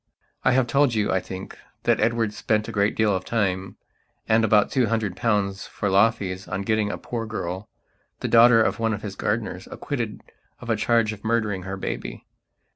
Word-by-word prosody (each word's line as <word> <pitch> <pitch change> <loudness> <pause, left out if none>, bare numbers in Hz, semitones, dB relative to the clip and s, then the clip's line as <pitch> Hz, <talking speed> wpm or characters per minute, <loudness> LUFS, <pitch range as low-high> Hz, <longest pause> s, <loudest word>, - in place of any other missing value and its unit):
I - - +4
have 130 -1 +3
told 135 -1 +2
you, 105 -1 +1
I 95 - +2
think, 95 +1 -8 0.3
that - - +2
Edward 115 -1 +1
spent 105 0 0
a - - -4
great 100 -1 +1
deal 105 -3 +2
of 95 - -3
time, 95 -4 -1 0.5
and 110 +1 +4
about 105 -2 +4
two 125 -3 +2
hundred 110 -4 -1
pounds 105 -4 0
for 100 - -2
law 100 +4 +6
fees 95 -4 -6
on 95 +1 -3
getting 110 0 +1
a - - -4
poor 115 -2 -5
girl, 95 -1 -5 0.5
the - - -1
daughter 115 0 +7
of - - -1
one 115 -1 +1
of 105 - -10
his 100 -2 -5
gardeners, 105 -3 -2
acquitted 120 -7 -4 0.4
of 120 -2 -4
a - - +3
charge 110 0 +2
of 105 - -12
murdering 110 -4 0
her 95 - -4
baby. - - -5
110 Hz, 200 wpm, -24 LUFS, 100-115 Hz, 0.5 s, daughter